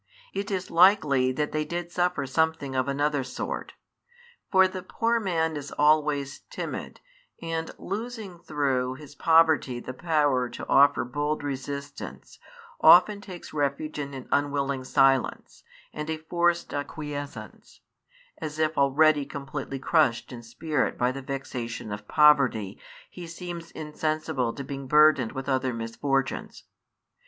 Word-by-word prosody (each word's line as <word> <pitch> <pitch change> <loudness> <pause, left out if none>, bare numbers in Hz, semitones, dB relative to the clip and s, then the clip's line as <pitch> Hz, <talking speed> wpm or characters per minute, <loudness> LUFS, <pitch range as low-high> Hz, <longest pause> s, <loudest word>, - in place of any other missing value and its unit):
It 200 +1 -3
is 190 -2 -3
likely 160 -8 +5
that 150 +3 -2
they 155 0 0
did 170 +2 -5
suffer 180 -5 0
something 150 -1 0
of 130 0 +1
another 145 0 0
sort; 125 - -5 0.8
for 190 -1 +6
the 185 0 -6
poor 230 +5 0
man 165 -6 0
is 145 -1 -6
always 150 -2 +2
timid, - - -6 0.4
and, 165 -1 -3
losing 210 -3 -6
through, 135 -6 -1
his 145 +1 -12
poverty 160 -6 +3
the 130 - -7
power 145 -5 +1
to - - -8
offer 140 +1 +5
bold 145 +4 -2
resistance, 140 0 -6 0.4
often 185 +5 +7
takes 185 -3 -10
refuge 150 +1 -2
in 140 -1 -5
an 130 - -8
unwilling 140 -2 0
silence, 135 -1 +1 0.3
and 150 +1 -5
a 160 - -1
forced 170 +2 0
acquiescence: 145 0 -7 0.6
as 150 0 -5
if 155 -1 0
already 145 +2 +4
completely 140 0 -6
crushed 135 -4 +1
in 120 -2 -8
spirit 130 +5 -2
by 125 +1 +2
the 135 +1 -6
vexation 125 -5 -5
of 105 0 -7
poverty, 135 -10 +4 0.3
he 175 -2 -9
seems 170 0 -7
insensible 155 -4 -2
to 140 - -7
being 135 0 -6
burdened 150 -4 +5
with 135 0 -5
other 130 -2 0
misfortunes. 135 +4 -2
145 Hz, 135 wpm, -26 LUFS, 135-160 Hz, 0.8 s, often